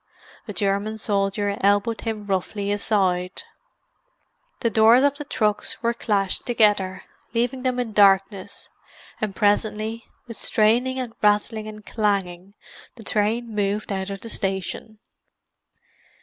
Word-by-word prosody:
A -, -, -5 dB
German 200 Hz, +2 st, -1 dB
soldier 200 Hz, -1 st, 0 dB
elbowed 205 Hz, +3 st, +2 dB
him 220 Hz, -2 st, -4 dB
roughly 200 Hz, +1 st, -2 dB
aside. 190 Hz, -3 st, 0 dB, 1.2 s
The 230 Hz, -, +1 dB
doors 225 Hz, +4 st, +6 dB
of 285 Hz, 0 st, +2 dB
the -, -, -3 dB
trucks 215 Hz, -5 st, -1 dB
were 235 Hz, 0 st, +2 dB
clashed 200 Hz, -4 st, 0 dB
together, 205 Hz, -5 st, +2 dB, 0.3 s
leaving 245 Hz, +2 st, 0 dB
them 255 Hz, -1 st, -1 dB
in 235 Hz, -3 st, -3 dB
darkness; 195 Hz, -1 st, +2 dB, 0.5 s
and 210 Hz, -3 st, -2 dB
presently, 215 Hz, +2 st, 0 dB, 0.2 s
with 230 Hz, -2 st, -9 dB
straining 240 Hz, +4 st, +2 dB
and 250 Hz, -3 st, -4 dB
rattling 210 Hz, +1 st, +1 dB
and 215 Hz, -1 st, -10 dB
clanging, 200 Hz, -3 st, -2 dB, 0.4 s
the 230 Hz, -, -12 dB
train 220 Hz, +3 st, 0 dB
moved 205 Hz, 0 st, -1 dB
out 190 Hz, 0 st, -2 dB
of 195 Hz, -1 st, -6 dB
the 230 Hz, -, -8 dB
station. 195 Hz, +2 st, -3 dB
210 Hz, 125 wpm, -23 LUFS, 200-225 Hz, 1.2 s, doors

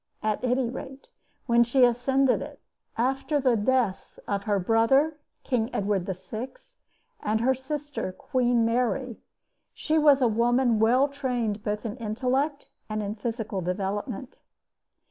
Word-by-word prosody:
At 215 Hz, +2 st, -1 dB
any 250 Hz, 0 st, +1 dB
rate, 265 Hz, -, -8 dB, 0.4 s
when 235 Hz, -1 st, +5 dB
she 245 Hz, +2 st, +4 dB
ascended 255 Hz, +2 st, +2 dB
it, -, -, -8 dB, 0.4 s
after 270 Hz, +5 st, 0 dB
the 255 Hz, -3 st, +3 dB
deaths 225 Hz, -2 st, 0 dB
of 200 Hz, 0 st, -2 dB
her 205 Hz, -2 st, +1 dB
brother, 230 Hz, -, +3 dB, 0.3 s
King 235 Hz, -3 st, 0 dB
Edward 195 Hz, -2 st, 0 dB
VI., 195 Hz, +6 st, -5 dB, 0.7 s
and 215 Hz, +1 st, 0 dB
her 255 Hz, +3 st, +3 dB
sister, 290 Hz, -4 st, -4 dB
Queen 240 Hz, +4 st, +1 dB
Mary, 245 Hz, +1 st, 0 dB, 0.6 s
she 315 Hz, 0 st, +1 dB
was 290 Hz, -2 st, +6 dB
a 250 Hz, -, +4 dB
woman 235 Hz, +1 st, +2 dB
well 250 Hz, +5 st, +4 dB
trained 245 Hz, -7 st, -2 dB
both 210 Hz, 0 st, -3 dB
in 220 Hz, +2 st, -4 dB
intellect 255 Hz, +6 st, -1 dB, 0.2 s
and 215 Hz, 0 st, -2 dB
in 200 Hz, 0 st, -3 dB
physical 220 Hz, -2 st, -4 dB
development. 195 Hz, +7 st, -4 dB
240 Hz, 135 wpm, -26 LUFS, 215-265 Hz, 0.7 s, was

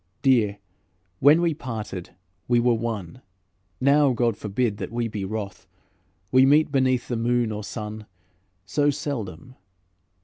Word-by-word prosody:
Dear, 115 Hz, -7 st, +3 dB, 0.6 s
when 150 Hz, +5 st, +6 dB
we 170 Hz, -2 st, +2 dB
parted 110 Hz, -, -6 dB, 0.3 s
we 120 Hz, -1 st, +3 dB
were 120 Hz, 0 st, +3 dB
one; 115 Hz, -1 st, -4 dB, 0.6 s
Now 140 Hz, 0 st, +4 dB
God 115 Hz, -2 st, +1 dB
forbid 105 Hz, +1 st, -1 dB
that -, -, -5 dB
we 120 Hz, 0 st, -1 dB
be 105 Hz, -3 st, -5 dB
wroth, 100 Hz, -2 st, -5 dB, 0.6 s
We 130 Hz, 0 st, +6 dB
meet 145 Hz, +3 st, +4 dB
beneath 130 Hz, -3 st, +1 dB
the 120 Hz, -, -2 dB
moon 120 Hz, 0 st, +1 dB
or 105 Hz, 0 st, -5 dB
sun 105 Hz, +1 st, -6 dB, 0.6 s
So 145 Hz, +9 st, +1 dB
seldom. 130 Hz, -, -5 dB
120 Hz, 135 wpm, -24 LUFS, 105-130 Hz, 0.6 s, when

